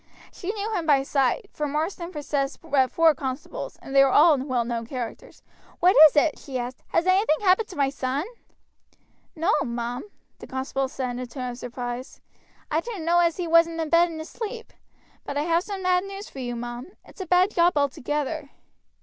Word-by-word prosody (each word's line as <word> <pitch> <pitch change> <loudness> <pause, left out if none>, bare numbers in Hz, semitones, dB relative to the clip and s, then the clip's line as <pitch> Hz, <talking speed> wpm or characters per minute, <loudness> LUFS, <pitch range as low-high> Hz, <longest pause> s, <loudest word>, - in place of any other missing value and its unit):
She 375 +1 -4
knew 430 +1 -4
him 340 -5 -2
by 275 -3 +4
sight, 275 - 0
for 300 - -2
Marsden 330 +4 -3
possessed 285 -3 -2
but 275 -5 +2
four 325 +3 +4
constables, 265 0 -6
and 270 - -7
they 275 - +8
were 275 - +4
all 305 +4 +6
well 255 -3 -1
known 230 -1 -3
characters. 245 -2 -7 0.4
"What 365 +2 +5
is 295 - -6
it?" 300 +1 +3
she 270 -3 -5
asked; 245 +1 -5
"has 335 - +1
anything 370 -4 +3
happened 400 +2 +3
to 370 - -11
my 275 -2 +1
son?" 275 +3 -2 1.1
"No, 335 +6 +1
mum," 240 +3 -4 0.3
the - - -10
constable 265 +1 -2
said 260 -1 -4
in 245 - -5
a 255 - -5
tone 250 0 -5
of 240 - -9
surprise, 245 +1 -6 0.5
"I 310 - +2
didn't 390 -3 -6
know 345 +1 +4
as 340 -2 +2
he 360 - -2
wasn't 335 0 +4
in 320 -1 -2
bed 340 +1 +4
and 320 -1 -7
asleep, 450 +8 -7 0.5
but 285 - -5
I 290 - +1
have 335 +1 +2
some 390 0 -6
bad 365 0 +2
news 395 +1 -7
for 270 - -10
you, 245 -2 -4
mum; 240 +8 -7
it's - - -12
a 370 - -5
bad 365 +3 +4
job 345 -1 +3
altogether." 290 +1 -1
300 Hz, 200 wpm, -25 LUFS, 260-350 Hz, 1.1 s, they